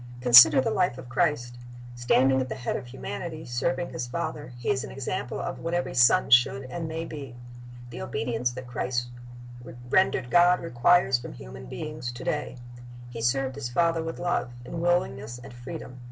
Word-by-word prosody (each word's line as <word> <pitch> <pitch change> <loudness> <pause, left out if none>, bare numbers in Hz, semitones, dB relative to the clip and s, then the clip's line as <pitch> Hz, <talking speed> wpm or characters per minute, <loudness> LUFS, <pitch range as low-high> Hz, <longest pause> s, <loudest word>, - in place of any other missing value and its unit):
Consider 125 +4 +9
the - - -1
life 180 -10 +1
of 130 -1 -10
Christ. 120 -4 -1 0.3
Standing 130 +2 +3
at 130 - -4
the - - -4
head 120 - -3
of - - -5
humanity, 155 +5 -6
serving 170 +8 -2
His 120 - -4
Father, 145 0 -4
He 120 +2 -1
is 130 -1 -1
an - - -7
example 130 -2 -4
of - - -4
what 165 +1 -3
every 175 - -2
son 130 +9 +4
should 130 +2 +5
and 170 -2 -4
may 160 +1 -4
be. 140 -6 -8 0.6
The 120 - -7
obedience 125 -4 -2
that 130 +1 -8
Christ 120 0 -3 0.8
rendered 190 -9 +2
God 175 +1 +5
requires 165 -2 +3
from 120 - -9
human 65 +1 -10
beings 150 - -6
to 120 - -9
day. 150 -3 -3 0.5
He 115 -1 -6
served 130 +3 0
His 135 -3 -5
Father 165 +5 +1
with 165 0 -5
love, 175 -8 -1 0.2
in 165 +6 -5
willingness 130 -9 0
and 125 +1 -12
freedom. 125 +1 -9
130 Hz, 180 wpm, -26 LUFS, 120-165 Hz, 0.8 s, Consider